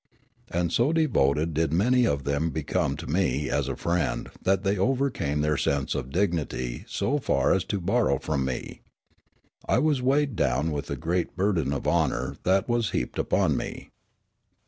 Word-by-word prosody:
And 85 -1 -1
so 120 +6 +3
devoted 80 - +2
did 80 0 0
many 120 +8 +3
of 70 -1 0
them 70 +4 0
become 80 -2 -1
to - - -7
me 75 -5 0
as - - 0
a - - -2
friend 85 -3 -1
that 95 0 +1
they 100 0 +1
overcame 120 - 0
their 75 0 +1
sense 70 0 0
of 60 - -4
dignity 75 -8 -2
so 145 +3 -1
far - - +2
as 95 - +1
to 100 - -2
borrow 100 - +2
from 70 -1 -2
me. 65 -1 -5 0.9
I - - +4
was 150 -4 +2
weighed 140 0 +2
down 75 -1 +1
with 75 -1 -3
the - - -4
great 85 +2 -1
burden 90 -7 +1
of 70 - -3
honour - - 0
that 95 +1 +3
was 120 -3 +1
heaped - - -3
upon - - +2
me. - - -5
85 Hz, 170 wpm, -26 LUFS, 70-110 Hz, 0.9 s, I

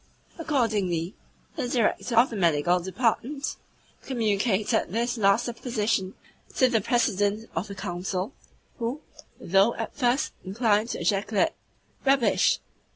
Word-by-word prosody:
Accordingly 205 - 0 0.4
he - - -3
(the - - -1
Director 240 0 0
of 240 +3 +5
the - - -4
Medical 175 -1 +2
Department) 230 - -1 0.5
communicated 220 -2 +1
this 235 +6 -1
last 210 +1 +3
supposition 225 -5 -1 0.4
to 255 - +5
the 230 -3 +1
President 215 -1 +1
of 195 - -2
the 200 - -8
Council, 185 +3 -3 0.5
who, 245 +6 -3 0.4
though 195 +6 +3
at 225 - -5
first 255 +1 +1
inclined 215 +2 +1
to - - -4
ejaculate 210 +9 +1 0.5
"Rubbish!" 270 -3 +3
220 Hz, 120 wpm, -26 LUFS, 195-245 Hz, 0.5 s, of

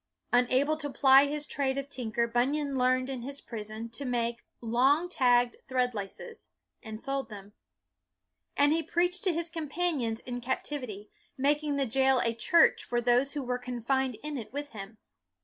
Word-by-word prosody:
Unable 255 +5 +3
to 295 -2 -3
ply 270 +1 +6
his 295 +1 -2
trade 275 -2 -1
of 275 0 -3
tinker, 235 -4 -1
Bun 240 +4 +1
yan 290 -2 -2
learned 255 0 +2
in 265 -2 -4
his 275 +3 -6
prison 220 0 -7
to 240 +5 -7
make 235 -2 -2
" - - -50
long 260 +8 +2
tagged 245 -7 +2
thread 250 -1 0
laces," 210 - -8 0.3
and 220 -1 -8
sold 275 -1 -3
them. 205 -1 -11 1.0
And 290 +1 +4
he 330 - +1
preached 350 +3 0
to 370 - +4
his 335 0 -3
companions 305 -7 -2
in 245 -1 -6
captivity, 250 -4 -4 0.3
making 290 +2 +1
the 280 -1 +1
jail 265 +2 +3
a 230 - 0
church 330 +9 +4
for 240 - -1
those 245 +3 +2
who 290 -2 -3
were 250 0 -2
confined 250 +1 -1
in 300 -2 -4
it 225 - -9
with 290 +2 -5
him. 210 +1 -9
260 Hz, 175 wpm, -29 LUFS, 240-285 Hz, 1.0 s, ply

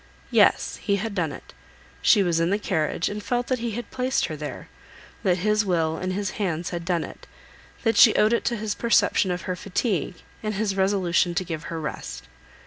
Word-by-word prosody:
Yes; - - +3
he 200 - 0
had 215 +2 -3
done 170 -6 -1
it. - - -11 0.5
She 200 - +5
was 170 -2 +1
in 165 +1 +2
the 200 - +2
carriage, 170 -5 -1
and 210 +1 -4
felt 245 +3 -1
that 255 0 -1
he 230 -1 -3
had 240 +3 -6
placed 255 +1 0
her 155 - -5
there, 150 -3 -7 0.5
that 180 -2 +2
his 210 +3 +2
will 165 -4 0
and 185 +2 -3
his 200 0 -2
hands 170 -3 -1
had 170 -1 -4
done 175 -2 0
it, - - -10 0.6
that 225 -3 +2
she 220 - +8
owed 215 +2 +4
it 235 - +1
to 240 - +1
his 210 0 -2
perception 210 -4 +2
of 180 0 -2
her 185 - -2
fatigue, 185 - -1 0.3
and 215 -1 -2
his 200 -1 -1
resolution 185 -3 +2
to 185 - +1
give 165 -2 -5
her 165 - -4
rest. - - -6
190 Hz, 210 wpm, -25 LUFS, 170-215 Hz, 0.6 s, she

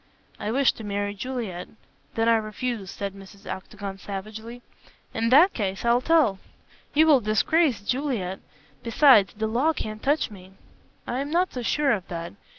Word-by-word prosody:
"I 210 - -3
wish 265 +3 +3
to 225 - -10
marry 205 0 -2
Juliet." 210 -5 -5 0.5
"Then 225 0 +1
I 230 - +5
refuse," 215 -1 -4
said 200 +1 -5
Mrs. 195 0 -14
Octagon, 195 +1 -7
savagely. 220 +5 -7 0.5
"In 225 0 0
that 315 +10 +6
case 195 -1 -3
I'll 235 +1 +4
tell." 280 -10 +3 0.6
"You 310 +2 +6
will 290 -5 +5
disgrace 230 +5 +2
Juliet. 235 -7 -2 0.4
Besides, 230 - +5
the 220 +1 -2
law 250 +9 +1
can't 215 -6 -5
touch 290 -3 +1
me." 190 -2 -13 0.5
"I 245 - -3
am 280 +1 -3
not 355 +4 +1
so 250 - -4
sure 280 +4 +1
of 195 -6 -1
that. 170 -1 -6
220 Hz, 160 wpm, -25 LUFS, 200-265 Hz, 0.6 s, that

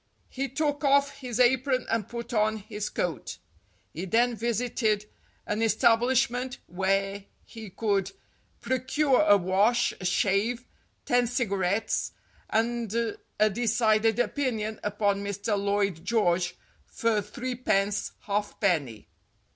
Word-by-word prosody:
He 270 +1 -3
took 290 +1 -1
off 280 0 +3
his 250 -3 -5
apron 255 +1 +3
and 225 -3 -1
put 235 +1 -6
on 215 0 +2
his 210 0 -5
coat. 160 -10 -3 0.6
He 170 +4 -4
then 235 +5 +2
visited 225 -2 0 0.4
an 210 +2 -2
establishment 245 +2 +2
where 195 +2 -1 0.2
he 225 -3 -10
could 200 -1 -1 0.5
pro 260 0 0
cure 270 +2 +2
a 205 -10 +6
wash, 200 +6 +2
a - - -5
shave, 205 +6 +1 0.4
ten 245 0 +2
cigarettes, 200 -4 -1 0.4
and 230 -1 0 0.5
a 215 0 +5
decided 220 0 +2
opinion 235 -4 -1
upon 205 -1 0
Mr. 200 +2 -2
Lloyd 200 -4 0
George 185 -5 +1 0.3
for 225 -2 0
threepence 210 -2 -1
hall 205 0 0 0.2
penny. 150 - 0
220 Hz, 115 wpm, -27 LUFS, 200-245 Hz, 0.6 s, a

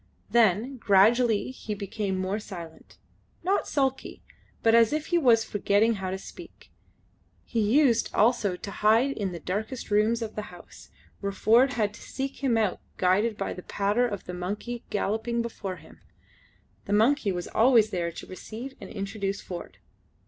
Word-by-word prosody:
Then 235 +3 +3
gradually 225 +3 +3
he 220 -4 -6
became 200 -1 -3
more 190 +3 -1
silent 170 -6 -10 0.5
not 385 +3 +1
sulkily 270 -2 -2 0.4
but 225 - +4
as 230 -1 +6
if 305 0 -1
he 345 - +5
was 235 -6 +5
forgetting 210 +1 +2
how 185 - -2
to 190 - -3
speak. - - -13 0.7
He 235 - -2
used 235 +2 +3
also 215 -4 +2
to 200 +3 -8
hide 225 +7 +3
in 200 -8 -3
the 170 - -6
darkest 215 - -4
rooms 220 +3 +2
of 220 - -6
the 210 - -4
house, 175 -1 -14 0.3
where 200 -1 -2
Ford 235 +7 +4
had 210 -4 0
to - - -13
seek 270 +1 -5
him 245 -4 +2
out 215 -5 0 0.2
guided 205 +4 +2
by 195 - -3
the 180 - -8
patter 205 +7 0
of 205 -4 -5
the 180 - -7
monkey 205 +7 -4
galloping 220 +3 -1
before 200 -5 -5
him. 160 -2 -16 0.9
The 200 - -2
monkey 225 +1 +3
was 175 -1 -4
always 225 -2 +4
there 170 -2 -2
to - - -9
receive 225 +7 -8
and - - -8
introduce 195 0 -3
Ford. 175 -2 -8
215 Hz, 165 wpm, -27 LUFS, 195-235 Hz, 0.9 s, as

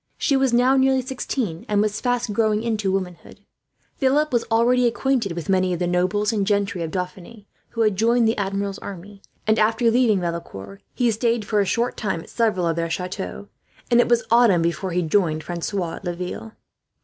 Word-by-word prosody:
She 280 - +1
was 265 -1 +2
now 250 +3 +4
nearly 265 -1 +3
sixteen, 245 -8 -4
and 205 -1 +2
was 215 0 0
fast 245 -3 -1
growing 215 0 +1
into 215 -4 -1
womanhood. 185 -3 -5 0.6
Philip 290 +2 +1
was 235 - +1
already 240 +2 +3
acquainted 240 -4 0
with 170 -1 -6
many 185 -2 +2
of - - -2
the 175 - -1
nobles 185 +5 0
and 200 -3 0
gentry 200 -3 0
of 165 - -3
Dauphiny 185 +4 -6 0.2
who 230 - -3
had 215 -3 +2
joined 230 +2 +3
the 225 - +1
Admiral's 200 0 -3
army 195 +1 -10 0.2
and, 220 +1 +2
after 225 +2 +3
leaving 230 -4 +3
Valecourt, 100 - -6
he 240 -2 +2
stayed 230 0 0
for 210 0 0
a - - +1
short 235 +6 -1
time 190 -6 -2
at - - -14
several 215 -7 +1
of 165 0 0
their 165 0 -1
chateaux; 185 +4 -5 0.4
and 240 - +5
it - - -1
was 240 -1 +3
autumn 230 -8 +5
before 170 +3 -1
he 180 0 0
joined 160 -2 +1
Francois 175 0 -3
at - - -13
Laville. 180 +5 -5
205 Hz, 195 wpm, -22 LUFS, 180-235 Hz, 0.6 s, and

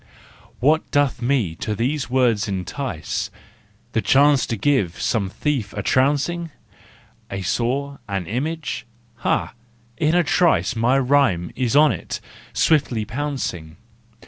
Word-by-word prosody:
What 155 +5 +2
doth 145 -4 +1
me 120 -9 +1
to 105 - -3
these 125 +2 -1
woods 125 -5 +2
entice? 95 - -3 0.6
The - - +1
chance 140 0 +4
to 115 - -2
give 100 -7 +1
some 100 -5 0
thief 120 -3 -2
a 105 - -4
trouncing 145 - +1 0.8
A 100 -1 -4
saw, 130 +8 -1
an 95 -3 -2
image? 150 - -3 0.3
Ha, 120 - 0 0.4
in 155 +1 +2
a 175 - +4
trice 170 -4 +2
My 120 +4 +3
rhyme 130 -11 +2
is 125 0 0
on 150 -1 +6
it, 95 - -5 0.3
swiftly 130 -8 +2
pouncing! 115 - -4
130 Hz, 125 wpm, -22 LUFS, 105-145 Hz, 0.8 s, on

